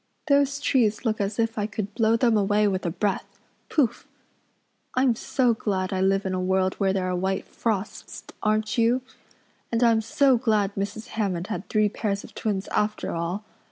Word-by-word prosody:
Those 280 Hz, -1 st, +3 dB
trees 245 Hz, -5 st, +1 dB
look 220 Hz, -2 st, 0 dB
as 200 Hz, +1 st, -2 dB
if 225 Hz, -1 st, 0 dB
I 205 Hz, -, 0 dB
could 210 Hz, -1 st, -5 dB
blow 225 Hz, +1 st, +3 dB
them 235 Hz, -1 st, +3 dB
away 210 Hz, 0 st, +3 dB
with 190 Hz, -2 st, -1 dB
a -, -, +1 dB
breath 200 Hz, +3 st, -2 dB, 0.3 s
pouf! 280 Hz, -8 st, +1 dB, 0.9 s
I'm 255 Hz, -1 st, +4 dB
so 245 Hz, +1 st, +1 dB
glad 195 Hz, -3 st, -2 dB
I 185 Hz, -, 0 dB
live 195 Hz, +1 st, +2 dB
in 190 Hz, -, -1 dB
a 185 Hz, -, -1 dB
world 190 Hz, 0 st, +1 dB
where 195 Hz, -2 st, +2 dB
there 190 Hz, -1 st, -1 dB
are 180 Hz, -, -1 dB
white 190 Hz, +1 st, -1 dB
frosts, 215 Hz, -3 st, -4 dB, 0.2 s
aren't 215 Hz, +1 st, +1 dB
you? 240 Hz, +3 st, +3 dB, 0.7 s
And 230 Hz, +1 st, +2 dB
I'm 230 Hz, -2 st, +4 dB
so 255 Hz, +3 st, +3 dB
glad 215 Hz, -4 st, +1 dB
Mrs. 205 Hz, +4 st, -4 dB
Hammond 190 Hz, -6 st, -2 dB
had 215 Hz, -3 st, -5 dB
three 215 Hz, -1 st, +3 dB
pairs 200 Hz, -1 st, -2 dB
of -, -, -13 dB
twins 205 Hz, -3 st, -2 dB
after 210 Hz, 0 st, -1 dB
all. 170 Hz, +5 st, -3 dB
210 Hz, 185 wpm, -25 LUFS, 195-230 Hz, 0.9 s, I'm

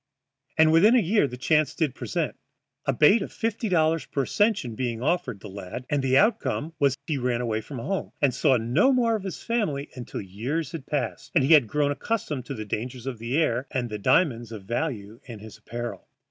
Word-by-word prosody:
And 160 Hz, 0 st, +6 dB
within 200 Hz, +9 st, +6 dB
a -, -, +6 dB
year 205 Hz, -4 st, +2 dB
the 125 Hz, -, -8 dB
chance 155 Hz, +3 st, +2 dB
did 155 Hz, -6 st, 0 dB
present, -, -, -3 dB, 0.5 s
a -, -, +4 dB
bait 155 Hz, -, +5 dB
of -, -, -5 dB
fifty 225 Hz, -1 st, -2 dB
dollars 160 Hz, -4 st, +2 dB
per 140 Hz, -, -1 dB
ascension 205 Hz, -, +1 dB
being 120 Hz, 0 st, -3 dB
offered 135 Hz, -, -1 dB
the -, -, -8 dB
lad, 100 Hz, +5 st, -7 dB
and 145 Hz, -1 st, +2 dB
the 130 Hz, 0 st, +3 dB
outcome 175 Hz, -6 st, +1 dB
was 140 Hz, -2 st, +2 dB
he 150 Hz, -4 st, -1 dB
ran 125 Hz, -1 st, 0 dB
away 110 Hz, -3 st, -1 dB
from 135 Hz, +5 st, -8 dB
home, 180 Hz, +9 st, -3 dB
and 140 Hz, -3 st, +3 dB
saw 130 Hz, -, +3 dB
no 120 Hz, -, +3 dB
more 235 Hz, -3 st, +2 dB
of 215 Hz, -, -3 dB
his 190 Hz, -2 st, -6 dB
family 160 Hz, -12 st, -1 dB
until 125 Hz, -2 st, -6 dB
years 125 Hz, -, -3 dB
had 155 Hz, -5 st, -7 dB
passed 135 Hz, -7 st, -3 dB
and 150 Hz, -, +5 dB
he 145 Hz, +5 st, +5 dB
had 145 Hz, -7 st, +6 dB
grown 145 Hz, +3 st, +1 dB
accustomed 145 Hz, -, -3 dB
to 110 Hz, -, -5 dB
dangers 120 Hz, +4 st, -5 dB
of 130 Hz, -4 st, -4 dB
the 120 Hz, +5 st, -2 dB
air 130 Hz, -5 st, +1 dB
and 120 Hz, -3 st, -3 dB
diamonds 120 Hz, -, +2 dB
of 110 Hz, -3 st, -8 dB
value 115 Hz, -2 st, -3 dB
in 120 Hz, -5 st, -8 dB
his 110 Hz, +1 st, -12 dB
apparel. 120 Hz, 0 st, -6 dB
135 Hz, 205 wpm, -26 LUFS, 120-165 Hz, 0.5 s, And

